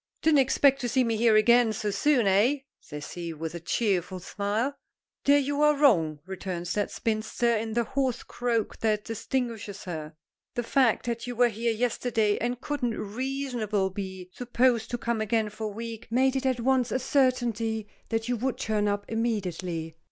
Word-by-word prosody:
"Didn't 310 -2 +5
expect 275 +1 +4
to 245 - -1
see 255 +2 +3
me 230 -2 0
here 225 0 +4
again 235 +1 +5
so 210 0 -2
soon, 265 +1 +2
eh?" 215 +9 +3 0.2
says 150 0 -8
he, 170 -2 -5
with 160 +1 -5
a 170 - -5
cheerful 185 0 0
smile. 210 +8 -2 0.5
"There 285 +1 +6
you 285 +1 0
are 300 0 +5
wrong," 165 - +3
returns 185 -2 -4
that 205 -1 0
spinster, 225 +2 0
in 220 0 -2
the 235 +1 +2
hoarse 265 0 -1
croak 235 -3 -2
that 215 -1 0
distinguishes 225 -3 -3
her. 155 -3 -6 0.4
"The 240 - -1
fact 255 -1 +2
that 235 0 -3
you 245 - -4
were 245 +1 +4
here 230 +2 -1
yesterday 225 -2 0
and 245 +1 -2
couldn't 250 -4 -2
reasonably 230 -4 -2
be 190 -2 -6
supposed 245 -2 +1
to 240 - -2
come 235 -2 -1
again 220 0 +1
for 215 +1 -5
a 210 -1 -4
week, 230 0 -6
made 260 +3 +2
it 265 0 0
at 255 -2 0
once 255 0 +2
a - - +2
certainty 240 -5 +1 0.2
that 225 0 -1
you 245 0 0
would 255 +3 -1
turn 210 -2 0
up 205 0 -1
immediately. 185 -8 -2
225 Hz, 180 wpm, -27 LUFS, 205-250 Hz, 0.5 s, There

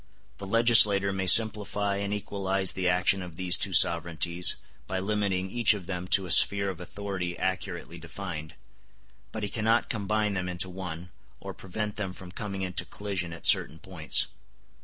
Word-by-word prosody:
The 100 - -8
legislator 105 -3 +5
may 95 -1 -3
simplify 105 0 +4
and 100 0 -4
equalize 95 -2 -1
the 90 -1 -2
action 90 +2 +1
of 90 -3 -10
these 90 0 -1
two 100 -1 -2
sovereignties, 85 0 +2 0.3
by 95 - -4
limiting 95 -2 -2
each 120 -3 +4
of 95 -4 -9
them 90 -1 -6
to 95 0 +3
a 90 - -3
sphere 100 +2 +6
of 90 - -12
authority 95 -2 -6
accurately 95 -2 -5
defined; 85 -2 -8 0.8
but 110 - -6
he 100 - -2
cannot 110 +2 0
combine 105 0 -2
them 90 -1 -4
into 90 +1 -4
one, 90 -1 -8 0.3
or - - -9
prevent 105 +2 -6
them 100 -3 -5
from 90 -1 -12
coming 100 0 -6
into 90 -1 -2
collision 90 -1 -6
at 80 - -9
certain 80 - +4
points. 85 -2 -1
95 Hz, 165 wpm, -26 LUFS, 90-100 Hz, 0.8 s, sphere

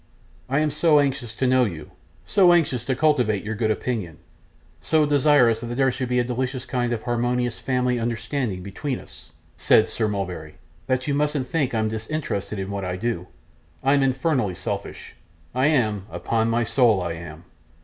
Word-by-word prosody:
'I 135 +3 +2
am 155 -1 +1
so 150 0 +4
anxious 130 -5 -1
to 130 - -1
know 130 0 +4
you, 85 -9 -5 0.3
so 180 - +5
anxious 140 -8 +2
to 130 - 0
cultivate 125 -8 +2
your 110 +1 -3
good 110 0 -1
opinion, 110 -7 -2 0.6
so 155 -1 +2
desirous 145 -5 +4
that 120 0 -4
there 135 0 +3
should 130 0 -4
be 125 - +1
a 125 - +3
delicious 125 +1 -3
kind 120 -2 -1
of 115 -2 -2
harmonious 120 0 -1
family 125 -1 0
understanding 115 -3 -2
between 125 +8 -4
us,' - - -14 0.3
said 110 - +4
Sir 110 - -1
Mulberry, 90 -7 -4 0.3
'that 130 0 0
you 145 - +1
mustn't 145 -2 0
think 145 -7 0
I'm 110 -1 +1
disinterested 110 -2 -3
in 95 +1 -4
what 100 -1 -3
I 90 -1 -2
do. 90 -3 -3 0.6
I'm 140 +1 +3
infernal 130 - +1
selfish; - - -5 0.4
I 130 +3 +2
am 110 -9 +1
upon 115 0 -1
my 120 +1 +1
soul 115 -3 +3
I 85 -2 -3
am. 80 -1 -9
120 Hz, 175 wpm, -23 LUFS, 110-135 Hz, 0.6 s, so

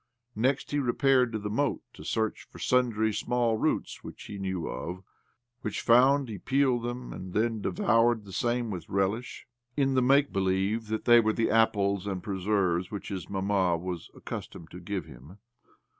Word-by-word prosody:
Next, 130 +5 0
he 145 - +1
repaired 130 -1 +3
to 110 - -2
the 105 -1 -5
moat 145 +7 0
tO' - - -13
search 110 -1 -2
for - - -13
sundry 115 -4 +1
small 115 +1 0
roots - - -1
which - - -9
he 100 - -8
knew 95 -3 -3
of; 90 +2 -5 0.6
wRich 105 - -3
found, 130 +3 +5
he 105 -4 -6
peeled 135 -1 +2
them, 120 +1 -5
aad 90 -1 -8
then 110 0 0
devoured 115 +3 +2
the 95 - -11
same 120 0 0
with 85 -4 -6
relish, 100 +5 -1 0.3
in 135 -1 +2
the 130 - +3
make 140 +3 +3
believe 95 +4 0
that 110 0 -3
they 120 -1 +8
were 110 -1 +2
the 115 - 0
apples 100 -3 +2
and 95 -3 -3
preserves 95 -3 0
which 105 - -6
his 95 -4 -5
mamma 95 -3 +1
was 90 0 -6
accustomed 80 -2 -8
to 90 - -9
give 95 +1 -4
him. 80 +10 -13
110 Hz, 175 wpm, -28 LUFS, 95-120 Hz, 0.6 s, they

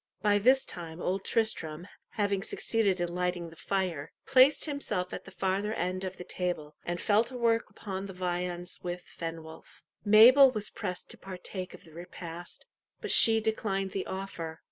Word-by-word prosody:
By 205 -1 +4
this 260 +5 +4
time 165 -1 -7
Old 190 +2 -2
Tristram, 175 -7 -1 0.3
having 200 -2 0
succeeded 205 -2 0
in 175 0 -2
lighting 180 -1 -2
the - - -14
fire, 180 -6 -2
placed 265 +2 +5
himself 215 - -3
at - - -6
the - - -10
farther 195 +3 -1
end 185 +2 -2
of 185 0 -5
the - - -7
table, 175 -5 -4
and 175 0 -3
fell 210 +4 +3
to 255 +1 -6
work 230 -1 +1
upon 195 -1 -6
the 190 - -8
viands 180 0 -3
with 175 0 -5
Fenwolf. 165 -1 -9 0.2
Mabel 235 +6 +8
was 215 -4 -3
pressed 185 -4 -5
to - - -5
partake 185 0 -7
of - - -17
the 160 - -17
repast, 175 0 -8 0.3
but - - -2
she 225 -1 +8
declined 200 -3 -1
the 190 - -4
offer. 170 -4 -6
185 Hz, 170 wpm, -29 LUFS, 175-210 Hz, 0.3 s, Mabel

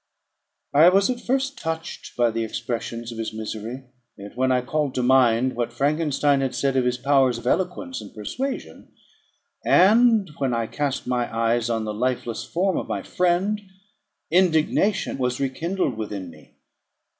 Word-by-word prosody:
I 155 +5 +8
was 195 +5 +3
at 245 -1 -5
first 270 +2 -1
touched 160 0 -5
by 120 -1 +3
the 115 0 -2
expressions 115 +1 -4
of 115 - -8
his 110 -1 -3
misery; 110 +3 -6 0.3
yet, 100 +1 -10
when 130 +1 +1
I 125 -1 +2
called 145 +1 -2
to 125 - 0
mind 125 -1 +3
what 120 0 -2
Frankenstein 145 +1 +1
had 135 -1 -2
said 135 -1 0
of 130 -1 +2
his 125 0 +1
powers 135 -2 +3
of 120 - -10
eloquence 190 - -1
and - - -11
persuasion, 260 - -5 0.7
and 215 0 +5
when 130 -3 0
I 115 - 0
again 110 - -9
cast 145 -3 -2
my 125 -1 -1
eyes 115 +1 +1
on 115 -1 -1
the 105 - -3
lifeless 120 0 -2
form 185 +2 0
of - - -3
my - - -3
friend, 180 +4 0 0.7
indignation 175 0 +2
was 125 -1 -1
rekindled 140 - -1
within 100 -5 -5
me. - - -19
130 Hz, 165 wpm, -23 LUFS, 120-175 Hz, 0.7 s, I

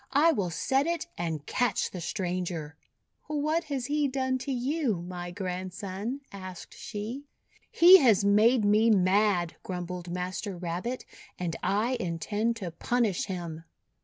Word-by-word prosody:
I 305 +4 +6
will 200 - -1
set 270 - +1
it 340 0 -1
and 160 -4 -3
catch 245 -1 0
the 180 - -6
stranger." 175 -3 -3 0.5
'What 305 +2 0
has 275 -5 -3
he 295 +1 +1
done 260 -1 -1
to 270 +2 -4
you, 260 - 0
my 175 0 -6
Grandson?'1 190 +6 -4
asked 185 -2 -9
she. 230 +7 -6 0.4
"He 360 +3 +9
has 220 - +4
made 215 +3 +5
me 215 +2 +4
mad," 190 -3 +3
grumbled 180 -1 -5
Master 180 +2 -4
Rabbit, 180 +9 -4 0.3
"and 170 -2 -3
I 225 +6 +1
intend 205 +7 -1
to 190 -7 -5
punish 220 +2 0
him." 170 -4 -5
205 Hz, 135 wpm, -28 LUFS, 180-255 Hz, 0.5 s, He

